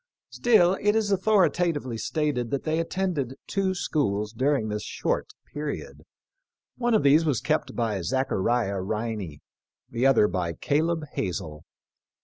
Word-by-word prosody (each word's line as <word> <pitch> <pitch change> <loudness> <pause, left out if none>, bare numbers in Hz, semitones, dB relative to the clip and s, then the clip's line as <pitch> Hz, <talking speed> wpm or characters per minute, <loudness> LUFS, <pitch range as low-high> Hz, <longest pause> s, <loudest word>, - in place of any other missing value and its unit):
Still 195 -6 +4
it 210 +1 +3
is 215 -2 +1
authori* 195 -1 +3
tatively 150 -9 -1
stated 145 -6 -1
that 140 - -2
they 160 +1 0
attended 165 -7 -2
two 190 -1 -1
schools 105 - -1
dur 135 +5 +2
ing 110 -5 -2
this 105 0 -3
short - - -2 0.3
period. 150 0 -5 0.7
One 240 -2 +1
of 215 - +3
these 145 +3 +5
was 145 -8 +1
kept 155 0 -1
by 110 -5 -1
Zachariah 115 -2 0
Riney, 105 -6 -4 0.5
the 120 +3 +2
other 120 -6 +5
by 85 -4 -2
Caleb 160 - 0
Hazel. 80 -4 -4
140 Hz, 140 wpm, -26 LUFS, 110-170 Hz, 0.7 s, these